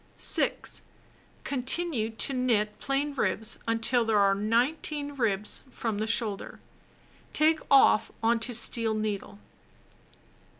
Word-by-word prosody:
6. - - +3 0.6
Continue 265 -2 -1
to 230 +4 -4
knit 225 -5 0
plain 280 +2 -1
ribs 220 -4 -2
until 230 +2 +1
there 225 -2 +1
are 200 -1 +4
19 265 +8 -1
ribs 210 -6 -2
from 225 -4 -4
the 215 - -2
shoulder. 220 -3 -2 0.7
Take 315 +1 +3
off 270 -5 +5
on 230 +1 +3
to 240 +1 -2
steel 225 -1 +1
needle. 210 -2 -4
230 Hz, 115 wpm, -28 LUFS, 215-270 Hz, 0.7 s, off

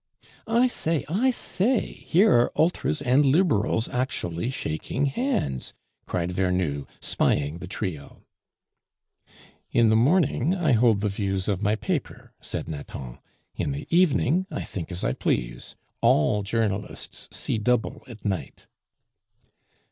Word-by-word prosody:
"I 235 +3 +4
say! 165 - -1
I 220 +11 +2
say! 235 0 +1
here 195 +6 +2
are 120 0 +4
Ultras 155 -2 +1
and 130 +2 +4
Liberals 135 - +2
actually 115 -6 -2
shaking 130 - -2
hands!" 135 - -1 0.3
cried 90 0 -1
Vernou, 90 -6 0
spying 75 +3 0
the 90 - -7
trio. 90 -7 -5 1.5
"In 115 -1 +4
the 110 - +4
morning 155 +4 +3
I 170 -6 +1
hold 115 -3 +4
the 105 - +1
views 95 -2 -2
of 100 -3 0
my 105 +1 +2
paper," 110 - -4
said - - -4
Nathan, 70 -5 -7 0.3
"in 145 - -2
the 140 0 -5
evening 180 0 +3
I 150 - -4
think 95 -1 -6
as 90 - -5
I - - +1
please; - - -2 0.3
all 105 +8 +3
journalists 105 -1 -2
see 110 - -1
double 120 +2 0
at 115 -4 -12
night." 95 -4 -3
115 Hz, 130 wpm, -25 LUFS, 90-150 Hz, 1.5 s, I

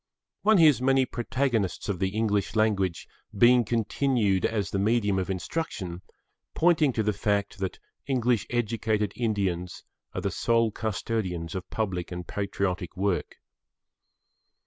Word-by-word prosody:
One 215 0 +5
hears 155 -7 +6
many 135 0 +3
protagonists 120 -4 -1
of 100 -4 -2
the 95 0 +1
English 105 0 0
language 100 -6 +1 0.3
being 120 +3 +6
continued 115 -3 +1
as 105 -4 -2
the 100 - -1
medium 105 -2 +2
of 95 - -3
instruction 95 - -4 0.5
pointing 160 -4 +4
to 110 - 0
the 105 0 +1
fact 100 -1 -1
that 95 -1 -3 0.3
English 125 -5 +1
educated 110 -3 0
Indians 95 -6 -2 0.3
are - - -2
the - - -1
sole 115 -1 +2
custodians 100 -6 -3
of 95 -1 -5
public 95 -5 -3
and 90 0 -5
patriotic 95 -2 -3
work. 95 -2 -1
105 Hz, 130 wpm, -27 LUFS, 95-120 Hz, 0.5 s, hears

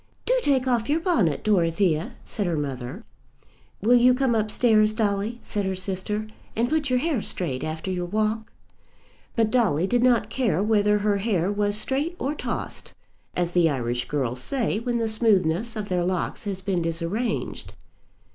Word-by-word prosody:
"Do - - +3
take 265 - +2
off 240 -2 +1
your 305 +3 +2
bonnet, 305 - +1
Dorothea," 180 +1 +1
said 205 -4 -3
her 170 -2 0
mother. 135 - -5 0.8
"Will 235 +3 +5
you 245 +1 +6
come 260 -2 +1
up 215 -1 +1
stairs, 215 -2 +4
Dolly," 210 +1 0
said 205 - -2
her 190 -1 -1
sister, 195 +3 -2 0.3
"and 230 +2 +1
put 310 -3 0
your 255 - +3
hair 280 -3 0
straight 145 -10 -2
after 160 +4 -4
your 180 -1 -2
walk?" 215 +3 -1 0.8
But 225 -2 +2
Dolly 195 - +2
did 240 +5 +1
not 245 -2 +3
care 210 -9 +1
whether 210 -1 +3
her 205 0 +1
hair 195 -3 0
was 205 0 +1
straight 280 +10 -1
or 280 -1 -2
tossed, - - -5 0.4
as 175 -1 0
the 175 -2 +4
Irish 120 -3 -2
girls 130 -4 -1
say 235 - -1
when 240 +1 -1
the 230 -1 0
smoothness 220 -1 +2
of 210 -2 -4
their 180 -2 0
locks 185 +4 -2
has 190 -2 -4
been 190 -3 0
disarranged. 165 - -3
210 Hz, 170 wpm, -25 LUFS, 175-235 Hz, 0.8 s, you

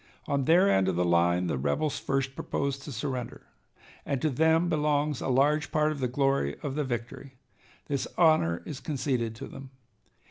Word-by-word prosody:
On 140 -2 0
their 175 +6 +5
end 95 - +3
of 95 - 0
the 90 +1 +1
line 85 +1 +2
the 80 -6 -1
rebels 75 - -1
first 135 -1 -1
proposed 140 0 -3
to 145 - -8
surrender, 125 0 -5 0.6
and 140 - -2
to 155 +3 0
them 160 +5 +3
belongs 150 -3 0
a - - -3
large 145 +4 +2
part 155 0 +2
of 150 - -5
the 130 - 0
glory 135 - 0
of 140 - -3
the 150 +1 -1
victory. 125 +1 -5 0.5
This 140 -2 -2
honor 155 - +3
is 145 -4 -6
conceded 130 -6 -2
to - - -7
them. 135 -1 -10
135 Hz, 180 wpm, -28 LUFS, 120-150 Hz, 0.6 s, their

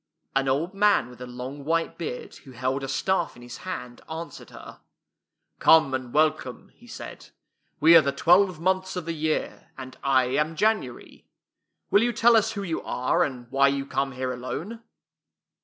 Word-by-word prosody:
An 135 0 +1
old 150 +8 0
man 200 - +2
with 125 0 -15
a 125 - -6
long 125 +3 -7
white 165 +3 -1
beard, 155 -7 -6
who 130 - -15
held 130 +2 -2
a - - -3
staff 190 +7 -1
in 120 - -14
his 120 0 -9
hand, 125 -10 -7
answered 165 +1 -8
her: - - -12 0.4
'' - - -54
Come 160 -4 +5
and 130 -2 -3
welcome," 155 +2 0
he - - -19
said. - - -9 0.5
"We 165 +3 +7
are 165 - +9
the 140 - 0
twelve 175 +4 +3
months 185 +2 0
of 180 -3 -4
the 165 - -3
year, 155 0 -3
and 130 -1 -9
I 135 -2 +3
am 150 +5 -1
January. 210 - -2 0.6
Will 200 - +5
you 240 +1 +1
tell 235 +1 +5
us 220 0 +2
who 200 -2 -4
you 170 -4 -3
are, 130 +7 0
and 125 -5 -4
why 140 0 +4
you 140 0 -1
come 135 0 -2
here 130 0 -3
alone? 165 - -6
150 Hz, 185 wpm, -25 LUFS, 130-180 Hz, 0.6 s, are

